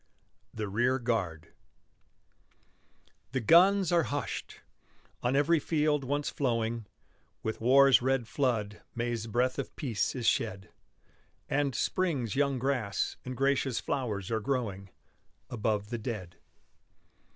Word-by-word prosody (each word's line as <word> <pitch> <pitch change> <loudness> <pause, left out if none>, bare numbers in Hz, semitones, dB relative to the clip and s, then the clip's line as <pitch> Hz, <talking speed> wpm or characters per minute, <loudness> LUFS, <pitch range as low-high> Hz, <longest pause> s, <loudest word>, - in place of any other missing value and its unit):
THE 110 -1 -4
REAR 120 +6 +1
GUARD 95 -10 -2 1.8
The 130 - +1
guns 180 - +5
are 170 -1 +4
hushed. 145 0 -4 0.6
On 125 +2 +1
every 155 +4 +4
field 150 -2 +1
once 145 +2 -1
flowing 115 -4 -1 0.6
With 110 0 -3
war's 135 +2 +6
red 130 -2 +1
flood 115 -6 -1
May's 120 -1 -2
breath 125 +4 0
of 135 - -5
peace 125 -6 -1
is 125 -3 -3
shed, 100 -5 0 0.8
And, 140 -2 0
spring's 145 - 0
young 140 -1 +2
grass 125 -6 -1
and 130 -1 -6
gracious 135 -2 +1
flowers 110 -8 -3
are 110 - +1
growing 105 -6 -2 0.6
Above 105 -2 -1
the 120 - -2
dead. 105 -7 -5
125 Hz, 120 wpm, -30 LUFS, 110-140 Hz, 1.8 s, war's